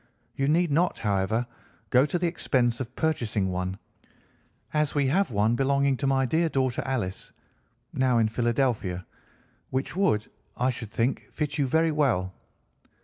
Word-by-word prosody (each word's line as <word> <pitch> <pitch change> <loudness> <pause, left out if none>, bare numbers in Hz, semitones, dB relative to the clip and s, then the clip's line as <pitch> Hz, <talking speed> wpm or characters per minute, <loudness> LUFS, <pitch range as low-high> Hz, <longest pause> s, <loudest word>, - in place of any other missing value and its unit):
You 135 - -1
need 165 +2 +2
not, 170 +5 +2
however, 105 +3 0 0.5
go 130 +3 +5
to 165 - -1
the 175 - -1
expense 125 -8 +1
of 130 -1 -6
purchasing 115 -11 0
one, 90 +1 -3 1.0
as 150 -1 +1
we 145 -1 +2
have 195 +7 +2
one 110 +1 +2
belonging 140 +1 +2
to 140 - -1
my 135 -1 +2
dear 160 +6 +1
daughter 130 -4 0
Alice 115 -9 -3 0.6
(now 130 -2 +2
in 115 -1 +3
Philadelphia), 115 -6 0 0.6
which 130 +5 -2
would, 180 - +1 0.3
I 125 +1 +2
should 120 -3 -7
think, 120 +4 -1
fit 150 0 -3
you 140 - +2
very 160 +4 +2
well. 115 -12 +1
130 Hz, 150 wpm, -27 LUFS, 115-150 Hz, 1.0 s, go